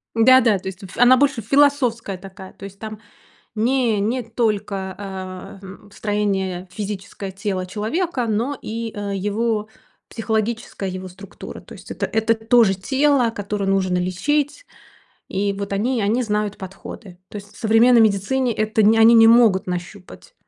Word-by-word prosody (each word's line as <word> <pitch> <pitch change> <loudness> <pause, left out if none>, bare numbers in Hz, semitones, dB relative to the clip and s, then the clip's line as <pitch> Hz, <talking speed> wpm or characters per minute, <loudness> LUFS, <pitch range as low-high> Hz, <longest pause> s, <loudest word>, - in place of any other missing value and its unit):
Да-да, 230 -2 +5
то - - -9
есть 190 +1 -7
ф 190 - -11
она 245 +1 +6
больше 270 -3 +1
философская 250 -5 +1
такая. 190 0 -12
То 195 - -11
есть 195 0 -11
там 215 0 -7 0.6
не 235 -1 +1
не 235 +5 -1
только, 210 -4 -2
э, 190 0 -8
м, 200 +2 -13
строение 195 -3 -2
физическое 200 -1 -6
тела 190 -1 -3
человека, 240 - -2
но 235 +6 -1
и, 225 0 -5
э, 200 -1 -4
его 210 +2 -1 0.4
психологическая 220 -3 -3
его 185 0 -6
структура. 185 +2 -11
То - - -14
есть - - -12
это - - -2
это 220 +1 +1
тоже 225 -2 +3
тело, 265 +4 +2
которое 205 -2 -4
нужно 190 -2 +1
лечить, 285 - -1 0.6
и 200 +1 -1
вот 200 0 -6
они 235 +4 0
они 225 +5 +1
знают 210 -1 -2
подходы. 190 0 -10
То - - -13
есть 205 +1 -12
в - - -17
современной 230 +2 +5
медицине 225 +5 +1
это 215 +1 0
нь 220 +2 +5
они 225 +1 +7
не 225 -1 +7
могут 225 -5 +5
нащупать. 180 - -7
210 Hz, 155 wpm, -21 LUFS, 195-230 Hz, 0.6 s, они